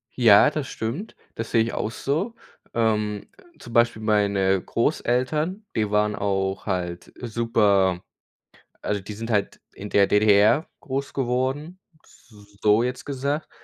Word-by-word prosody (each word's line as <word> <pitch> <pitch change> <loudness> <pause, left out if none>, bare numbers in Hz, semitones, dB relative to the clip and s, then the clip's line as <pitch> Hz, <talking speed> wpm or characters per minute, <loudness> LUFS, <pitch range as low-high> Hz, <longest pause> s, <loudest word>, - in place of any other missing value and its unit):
Ja, 115 -1 +6
das 150 -3 -4
stimmt. 130 - -5 0.2
Das 115 0 -5
sehe 115 - +4
ich 115 - -4
auch 110 - -2
so. 165 - -2 0.4
Ähm, 105 -2 0 0.3
zum 120 - -11
Beispiel 120 -2 +3
meine 100 -3 +2
Großeltern, 150 - -1
die 105 -2 0
waren 105 0 +2
auch 95 -1 -2
halt 90 -3 -3
super 105 -6 +2 0.8
also, 105 -1 -2
die 100 +3 -8
sind 115 +2 -5
halt 105 -2 0
in 105 +1 -8
der 100 -1 +4
DDR 105 - +4
groß 135 +1 -4
geworden, 135 +7 -2 0.2
s - - -23 0.3
so 105 +2 +4
jetzt 125 +1 -3
gesagt. 140 +2 -3
115 Hz, 135 wpm, -24 LUFS, 105-130 Hz, 0.8 s, Ja